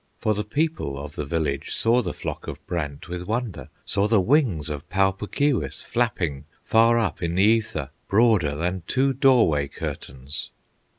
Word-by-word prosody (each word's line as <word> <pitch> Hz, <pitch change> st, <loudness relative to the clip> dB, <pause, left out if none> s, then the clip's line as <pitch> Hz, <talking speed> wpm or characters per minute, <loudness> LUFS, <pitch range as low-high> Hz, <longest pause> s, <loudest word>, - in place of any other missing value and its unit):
For 110 Hz, -, +1 dB
the 105 Hz, 0 st, -2 dB
people 145 Hz, -, -1 dB
of 70 Hz, +1 st, -7 dB
the 75 Hz, -, -5 dB
village 75 Hz, -3 st, -2 dB
Saw 120 Hz, +2 st, +3 dB
the -, -, -3 dB
flock -, -, -6 dB
of -, -, -7 dB
brant 75 Hz, -5 st, -4 dB
with 90 Hz, 0 st, -5 dB
wonder, 110 Hz, -, -3 dB, 0.2 s
Saw 100 Hz, +1 st, +1 dB
the 110 Hz, -1 st, +4 dB
wings 105 Hz, -, +2 dB
of 75 Hz, -2 st, -5 dB
Pau 95 Hz, 0 st, +3 dB
Puk 100 Hz, +2 st, -8 dB
Keewis 140 Hz, -5 st, +1 dB
Flapping 85 Hz, -, -1 dB, 0.2 s
far 115 Hz, +1 st, +4 dB
up 115 Hz, -, -1 dB
in 85 Hz, -1 st, -1 dB
the 95 Hz, -, +4 dB
ether, 105 Hz, -10 st, +1 dB, 0.2 s
Broader 100 Hz, -9 st, +3 dB
than 90 Hz, +4 st, -2 dB
two 135 Hz, +1 st, +2 dB
doorway 120 Hz, -, +4 dB
curtains. 70 Hz, +1 st, -6 dB
95 Hz, 170 wpm, -24 LUFS, 75-115 Hz, 0.2 s, the